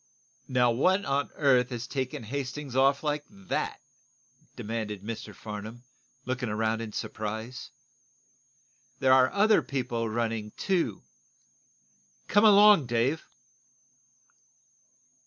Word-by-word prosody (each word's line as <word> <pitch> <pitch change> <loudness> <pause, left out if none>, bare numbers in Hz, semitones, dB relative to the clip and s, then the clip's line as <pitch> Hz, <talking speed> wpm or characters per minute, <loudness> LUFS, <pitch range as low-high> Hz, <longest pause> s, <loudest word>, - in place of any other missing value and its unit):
"Now, 125 -2 +3
what 185 +11 +2
on 140 +1 0
earth 130 -4 +3
has 120 -2 -5
taken 130 -2 -4
Hastings 135 +2 -5
off 135 +2 +3
like 150 -1 -1
that?" 195 -2 -4 0.8
demanded 110 -3 -4
Mr. 115 +1 -6
Farnum, 110 +3 -8 0.4
looking 125 -2 -2
around 110 +1 -1
in 110 -2 -6
surprise. 110 +4 -5 1.3
"There 130 -1 +4
are 130 0 +5
other 210 +1 +4
people 120 -4 -3
running, 110 -2 -2
too. 175 - -1 1.2
Come 205 +2 +4
along, 205 - +7
Dave!" 120 +7 0
125 Hz, 100 wpm, -28 LUFS, 115-145 Hz, 1.3 s, along